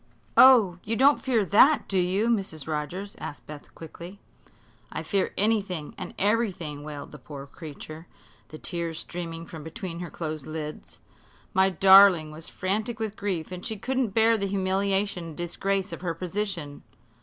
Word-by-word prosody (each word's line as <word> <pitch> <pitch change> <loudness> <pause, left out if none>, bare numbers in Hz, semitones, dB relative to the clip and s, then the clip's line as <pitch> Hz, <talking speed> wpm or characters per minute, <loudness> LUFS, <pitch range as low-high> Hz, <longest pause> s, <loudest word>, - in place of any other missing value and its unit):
"Oh, 220 -9 +7
you 225 - -1
don't 275 +4 +5
fear 235 -6 +1
that, 260 - +5
do 190 - +1
you, 185 +5 +1
Mrs. 195 - -1
Rogers?" 165 +6 -4
asked 145 - -7
Beth, 150 -1 -11
quickly. 170 +4 -10 0.7
"I - - -4
fear 195 -2 0
anything 200 -7 0 0.2
everything!" 190 -9 0
wailed 150 -1 -8
the 150 - -11
poor 140 +1 -9
creature, 155 +2 -10 0.4
the 155 - -10
tears 170 -1 -3
streaming 165 -1 -6
from 160 -2 -9
between 165 +2 -6
her 175 -1 -5
closed 155 -3 -5
lids. 155 -1 -7 0.5
"My 190 -1 +4
darling 190 -3 +7
was 160 +2 -8
frantic 215 +5 -2
with 220 -2 -3
grief, 185 -6 -3
and 180 0 -7
she 220 -2 -4
couldn't 255 -1 -1
bear 225 0 +5
the 200 - -1
humiliation 195 0 0
and 160 -2 -9
disgrace 195 +3 -2
of - - -7
her 170 -3 -2
position. 180 -4 -4
185 Hz, 155 wpm, -26 LUFS, 160-205 Hz, 0.7 s, Oh